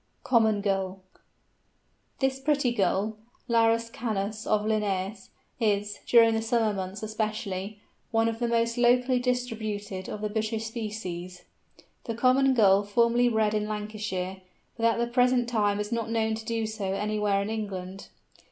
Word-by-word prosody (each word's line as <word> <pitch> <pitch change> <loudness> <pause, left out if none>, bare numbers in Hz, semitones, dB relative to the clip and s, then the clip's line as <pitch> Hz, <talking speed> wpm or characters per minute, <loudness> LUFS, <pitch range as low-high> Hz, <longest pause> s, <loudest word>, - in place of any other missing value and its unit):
COMMON 220 -4 +3
GULL. 195 -1 -1 1.2
This 265 0 0
pretty 275 -3 +1
Gull, 205 +1 0 0.3
the 240 - -4
Larus 230 0 +3
canus 215 -2 -3
of 210 -1 +2
Linnæus, 205 -2 -1 0.3
is, 205 -2 0
during 230 -1 +6
the 225 - 0
summer 225 -2 +1
months 195 +2 -5
especially, 215 -2 -3 0.3
one 225 0 +2
of 225 0 -2
the 240 - 0
most 230 0 +1
locally 250 +1 +4
distributed 220 -6 -3
of 210 - -5
the 210 - -1
British 220 +1 -2
species. 205 -6 -6 0.6
The 230 - -3
Common 260 +2 +4
Gull 200 -4 +5
formerly 235 +4 +3
bred 220 -2 +1
in 210 0 0
Lancashire, 210 -3 -4 0.3
but 230 0 +2
at 230 - +2
the 235 - +1
present 245 0 +2
time 205 -3 +1
is 210 0 -3
not 230 -1 -2
known 220 -1 +1
to 220 0 -5
do 225 -1 -1
so 210 -3 -3
anywhere 210 0 0
in 210 - -4
England. 195 -3 -5
220 Hz, 150 wpm, -27 LUFS, 205-230 Hz, 1.2 s, during